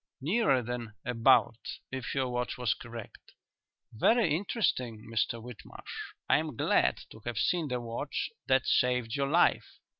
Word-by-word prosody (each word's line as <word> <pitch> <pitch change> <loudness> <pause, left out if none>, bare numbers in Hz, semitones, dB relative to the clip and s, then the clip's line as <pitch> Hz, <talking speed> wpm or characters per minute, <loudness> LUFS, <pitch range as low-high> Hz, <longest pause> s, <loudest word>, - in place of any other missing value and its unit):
"Nearer 155 - +2
than 120 -2 -5
'about,' 115 -1 +3
if 130 0 -4
your 135 -1 +1
watch 125 0 -2
was 125 -5 +1
correct. 115 -2 -10 0.6
Very 180 - +3
interesting, 130 - -1
Mr 115 +1 0
Whitmarsh. 120 -1 -9
I - - +5
am 155 -4 -4
glad - - +3
to 110 - -12
have 120 -2 -3
seen 170 +6 +1
the 125 -2 -2
watch 115 -1 -4 0.2
that 130 -1 +3
saved 125 -1 +2
your 140 -1 0
life." 170 +4 +2
125 Hz, 145 wpm, -30 LUFS, 115-140 Hz, 0.6 s, I